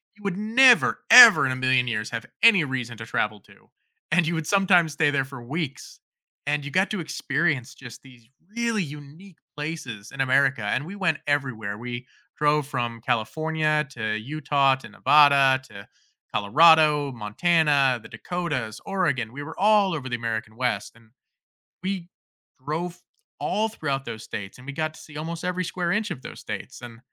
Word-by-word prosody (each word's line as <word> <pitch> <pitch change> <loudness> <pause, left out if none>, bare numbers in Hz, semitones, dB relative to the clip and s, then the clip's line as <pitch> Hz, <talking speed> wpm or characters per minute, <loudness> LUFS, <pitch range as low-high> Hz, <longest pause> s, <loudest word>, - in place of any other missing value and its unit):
you 205 - -20
would 195 -2 -3
never, 235 +4 +4
ever 230 - +10
in 130 - 0
a 130 - -2
million 130 -1 +2
years 110 -2 -3
have 115 0 -5 0.2
any 210 -8 +6
reason 125 -4 -4
to 110 - -8
travel 105 -2 -2
to. - - -23 0.4
And 175 +1 +3
you 170 +1 -1
would 160 -2 -4
sometimes 180 -5 +3
stay 150 0 +2
there 140 -2 0
for 135 -2 -11
weeks, 145 +2 -6 0.5
and 145 0 0
you 145 - -6
got 190 +2 +1
to 210 - -2
experience 150 -4 -2
just 125 -3 -12
these 125 -4 -18 0.3
really 230 -4 0
unique 150 +5 -12 0.2
places 150 -9 -6
in 135 - -4
America, 135 -3 +2
and 130 +8 -1
we 195 +4 -8
went 185 -6 0
everywhere. 115 -8 -2
We 120 +1 -7 0.3
drove 150 0 +2
from 120 -4 -4
California 155 +5 0
to 110 -3 -3
Utah 140 +2 +1
to 130 - -13
Nevada, 140 -3 +4
to 100 0 -12 0.5
Colorado, 150 +6 +4
Montana, 135 +3 +1
the - - -12
Dakotas, 150 -12 -4
Oregon. 140 - -1
We 145 +2 -7
were 160 +2 -9
all 205 -2 +3
over 145 -5 -5
the 125 - -2
American 110 -1 -4
West, 125 0 -2
and 115 -1 -22 0.8
we 190 -3 -3 0.6
drove 170 +4 -4 0.4
all 215 +2 0
throughout 140 -10 -4
those 115 -2 -8
states, 95 +1 -8
and 125 - -14
we 140 - -6
got 155 +2 -3
to - - -14
see 150 -1 -13
almost 165 +3 -6
every 180 0 -2
square 175 0 -2
inch 210 +1 -1
of 145 -7 -6
those - - -10
states. - - -7
And 120 -1 -10
145 Hz, 175 wpm, -24 LUFS, 125-170 Hz, 0.8 s, ever